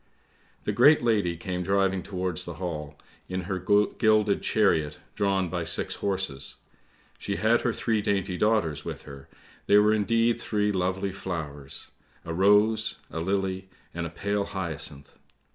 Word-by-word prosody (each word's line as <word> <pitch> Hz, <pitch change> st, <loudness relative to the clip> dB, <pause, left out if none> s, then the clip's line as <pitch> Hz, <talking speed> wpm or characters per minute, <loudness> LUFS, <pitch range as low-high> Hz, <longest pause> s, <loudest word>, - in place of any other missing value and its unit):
" -, -, -35 dB
The -, -, -1 dB
great 150 Hz, -3 st, +6 dB
lady 100 Hz, -8 st, +1 dB
came 90 Hz, +1 st, -3 dB
driving 95 Hz, 0 st, +1 dB
towards 90 Hz, -2 st, -3 dB
the -, -, -7 dB
Hall, 75 Hz, -5 st, -5 dB, 0.3 s
in 95 Hz, 0 st, -2 dB
her 95 Hz, +1 st, -3 dB
gilded 105 Hz, +2 st, +3 dB
chariot 80 Hz, -8 st, +2 dB, 0.2 s
drawn 95 Hz, -2 st, +1 dB
by 85 Hz, -1 st, -3 dB
six 80 Hz, -, -1 dB
horses. 95 Hz, -8 st, -3 dB, 0.6 s
She 100 Hz, -, -3 dB
had 115 Hz, +3 st, +3 dB
her 125 Hz, -, +1 dB
three 110 Hz, -1 st, 0 dB
dainty 100 Hz, -2 st, 0 dB
daughters 90 Hz, -8 st, +1 dB
with -, -, -6 dB
her, 70 Hz, -2 st, -11 dB, 0.4 s
they 100 Hz, -, +6 dB
were 105 Hz, +1 st, +5 dB
indeed 115 Hz, +2 st, +2 dB
three 105 Hz, -1 st, 0 dB
lovely 95 Hz, +1 st, -1 dB
flowers. 75 Hz, -7 st, -6 dB, 0.3 s
A 85 Hz, -, -4 dB
rose, 105 Hz, +4 st, +3 dB
a 80 Hz, -, -4 dB
lily, 95 Hz, +1 st, -1 dB, 0.2 s
and 85 Hz, 0 st, -3 dB
a -, -, -7 dB
pale 100 Hz, +4 st, -2 dB
hyacinth. 80 Hz, -7 st, -5 dB
95 Hz, 150 wpm, -27 LUFS, 85-105 Hz, 0.6 s, great